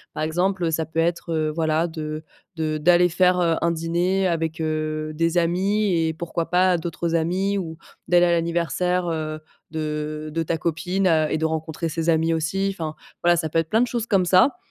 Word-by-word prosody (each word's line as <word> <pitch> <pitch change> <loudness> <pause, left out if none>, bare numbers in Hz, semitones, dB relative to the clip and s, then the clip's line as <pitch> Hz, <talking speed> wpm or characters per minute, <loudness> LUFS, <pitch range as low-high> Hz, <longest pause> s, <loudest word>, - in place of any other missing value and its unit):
par - - -2
exemple, 180 +4 0
heu, 165 - 0
ça 160 0 -1
peut 160 +1 -3
être, 170 0 0
heu, 155 -1 0
voilà 160 0 +1
de 155 -1 -5 0.3
de 155 -1 -1
d'aller 175 +2 +5
faire, 180 +1 +3
heu, 170 -2 +2
un 170 - +2
dîner 175 +4 0
avec, 165 -1 -2
heu, 155 0 -2
des 165 +2 0
amis, 190 +4 +1
et, 160 - -1
pourquoi 170 +1 -4
pas, 180 0 +3
d'autres 170 0 -3
amis 185 +5 0
ou 160 -3 -6 0.3
d'aller 175 0 +5
à 175 - +2
l'anniversaire, 170 +1 0
heu, 155 -1 -3 0.3
de 155 -1 -4
de 165 0 0
ta 165 +1 -1
copine 180 +4 0
a 155 -3 +2
et 155 - +1
de 160 - 0
rencontrer 160 +1 -2
ses 165 +1 -2
amis 165 0 +2
aussi, 165 +5 0
enfin 155 -2 -4 0.3
voilà, 175 0 +5
ça 160 -1 -1
peut 165 - -1
être 165 -1 -2
plein 225 +2 +3
de 245 - +2
choses 235 -2 -2
comme 195 -5 +2
ça. 185 - +4
165 Hz, 205 wpm, -23 LUFS, 160-180 Hz, 0.3 s, d'aller